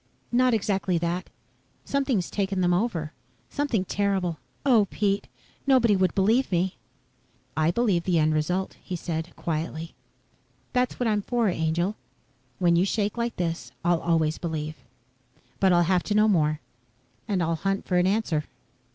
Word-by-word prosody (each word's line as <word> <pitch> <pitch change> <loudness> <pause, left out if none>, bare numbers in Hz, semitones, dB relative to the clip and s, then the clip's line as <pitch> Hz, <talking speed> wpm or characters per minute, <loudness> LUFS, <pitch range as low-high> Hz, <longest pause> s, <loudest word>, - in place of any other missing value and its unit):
"Not 250 0 +4
exactly 195 -4 0
that. 170 +2 -2 0.6
Something's 265 -10 0
taken 195 -2 -1
them 175 0 +3
over. 175 -6 -1 0.4
Something 255 -10 0
terrible. 190 -5 0 0.3
Oh, 235 -7 +5
Pete! 200 -1 0 0.4
Nobody 245 -6 +5
would 185 -1 +1
believe 220 +7 +3
me." 180 +1 +1 0.8
"I 155 +1 +2
believe 190 -4 +1
the 180 -2 +2
end 155 0 +3
result," 180 +5 -1
he 180 - -4
said, 165 0 -4
quietly. 165 0 -3 0.8
"That's 250 0 0
what 245 - 0
I'm 210 -2 +2
for, 235 0 +1
angel. 170 +4 0 0.6
When 175 -3 +3
you 170 - +4
shake 205 +1 0
like 235 0 -2
this 170 -1 -3
I'll 175 -1 +3
always 160 -2 +1
believe. 155 -2 -3 0.9
But 190 -1 +4
I'll 175 -1 +5
have 180 +1 +2
to 210 - 0
know 215 +1 +5
more. 155 -6 +2 0.7
And 195 -5 +1
I'll 165 +1 +1
hunt 195 +3 -1
for 180 - +1
an 180 - +3
answer." 190 -7 0
185 Hz, 150 wpm, -26 LUFS, 170-210 Hz, 0.9 s, Oh